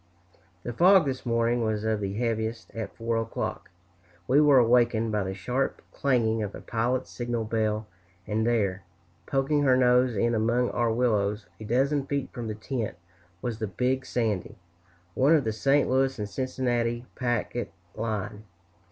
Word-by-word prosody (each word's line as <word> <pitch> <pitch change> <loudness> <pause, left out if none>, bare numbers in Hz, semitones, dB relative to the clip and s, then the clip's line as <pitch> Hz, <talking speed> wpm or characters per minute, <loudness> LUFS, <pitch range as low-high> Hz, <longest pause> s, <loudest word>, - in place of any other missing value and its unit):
The 120 - -4
fog 185 - +6
this 130 -2 -3
morning 115 +1 +1
was 110 -1 -1
of 110 -1 0
the 100 -1 -2
heaviest. 115 0 -2
At 110 -3 -6
4 115 0 -1
o'clock 115 -1 -4 0.6
we 140 +4 +5
were 145 -2 +6
awakened 120 -2 +3
by 105 -1 0
the 95 0 -4
sharp 125 +8 -2
clanging 115 -5 +1
of 105 -2 -4
a - - -9
pilot's 120 +3 -1
signal 120 -1 -2
bell, 110 -1 -1 0.4
and 110 +1 -1
there, 105 -5 +1 0.5
poking 140 +2 +1
her 130 -3 +4
nose 125 -1 +4
in 120 +4 +1
among 120 +2 +1
our 120 -1 +1
willows, 105 -3 +1
a 110 - -7
dozen 135 +5 +1
feet 140 -2 -3
from 120 -2 -5
the 110 - -3
tent, 110 -3 -4 0.5
was 115 -3 -3
the 110 - -2
"Big 125 +8 0
Sandy," 110 -3 -2 0.6
one 140 - +4
of 150 - +2
the 110 -2 -1
St. 135 +6 +2
Louis 135 +1 +2
& 105 - -4
Cincinnati 120 -2 -1
packet 120 -1 -2 0.2
line. 110 -1 -4
115 Hz, 160 wpm, -27 LUFS, 110-130 Hz, 0.6 s, fog